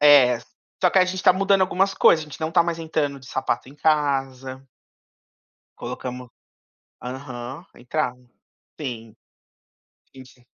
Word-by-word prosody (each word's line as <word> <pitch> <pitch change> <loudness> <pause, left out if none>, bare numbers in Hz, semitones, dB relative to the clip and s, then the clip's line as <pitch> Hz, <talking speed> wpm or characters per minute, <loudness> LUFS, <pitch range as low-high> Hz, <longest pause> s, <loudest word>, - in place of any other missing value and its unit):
é, 140 -5 +7 0.4
só 180 - +5
que 190 - +4
a 185 - +6
gente 185 +1 -3
tá - - +7
mudando 195 +1 +3
algumas 190 +1 +2
coisas, 160 -1 +5
a - - -16
gente 150 - -10
não 160 +1 -2
tá - - +5
mais 170 -1 -2
entrando 155 -3 -1
de 135 - -16
sapato 130 -1 -2
em 140 - -14
casa. 135 -3 0 1.1
Colocamos. 125 0 -6 0.7
Aham, 130 +3 -7
entrava. 125 +1 -2 0.6
Sim. 115 -6 -6 1.0
Sim, 130 -1 -11
sim. 125 -1 -21
140 Hz, 140 wpm, -23 LUFS, 125-160 Hz, 1.1 s, é